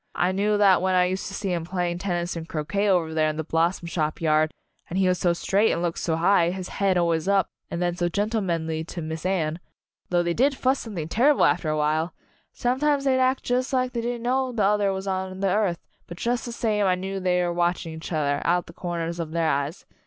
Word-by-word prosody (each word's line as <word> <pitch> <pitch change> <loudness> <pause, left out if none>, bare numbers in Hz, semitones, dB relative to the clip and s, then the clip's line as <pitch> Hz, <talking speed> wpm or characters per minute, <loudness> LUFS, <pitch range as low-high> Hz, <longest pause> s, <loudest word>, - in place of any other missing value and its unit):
I 180 +1 +2
knew 205 +2 +1
that 195 -3 +5
when 185 0 +1
I 180 0 +4
used 185 +1 -2
to - - -7
see 195 -2 -2
'em 170 -2 -2
playing 175 0 -2
tennis 175 -2 -2
and 165 0 -6
croquet 200 +7 -1
over 170 -4 +2
there 155 -1 +2
in 155 - -3
the 160 - -2
Blos 165 +4 +1
som 170 - -9
Shop 155 -2 -2
yard, 155 -1 +2 0.4
and 180 - -3
he 190 -1 +3
was 180 -1 +1
so 175 - +3
straight 195 +5 +2
and 170 - -1
looked 170 -1 -1
so 165 - 0
high, 170 +1 +3
his 185 0 -5
head 195 -2 +1
always 170 -1 +1
up, 195 -2 +2 0.2
and 170 +1 -2
then 175 -1 0
so 175 -1 0
gentlemanly 170 -6 -1
to 170 +1 -7
Miss 160 +2 -4
Anne 165 -4 -1 0.5
though 175 -1 +2
they 170 0 0
did 270 +7 +2
fuss 265 +1 +1
something 185 -9 -5
terrible 265 - +4
after 155 - +1
a 155 - 0
while! 155 +2 0 0.4
Sometimes 275 +3 +1
they'd 265 -1 +2
act 260 +1 +2
jus' 255 +2 -1
like 255 -1 +1
they 235 - -1
didn't 240 0 -3
know 260 +1 +1
the 225 -4 0
other 205 0 +3
was 190 0 -4
on 190 -1 -3
the 195 0 +1
earth, 200 -5 +1 0.3
but 175 - -9
jus' 240 +4 -1
the 240 - -5
same 215 -3 0
I 185 - +3
knew 190 +1 -4
they 180 -1 +1
were 175 0 -1
watching 175 -1 -1
each 160 +2 -8
other, 145 -3 0
out 175 +1 +1
the 165 - -13
corners 170 -1 -4
of 165 -2 -3
their 165 -1 +1
eyes. 140 +4 -2
180 Hz, 240 wpm, -25 LUFS, 165-205 Hz, 0.5 s, that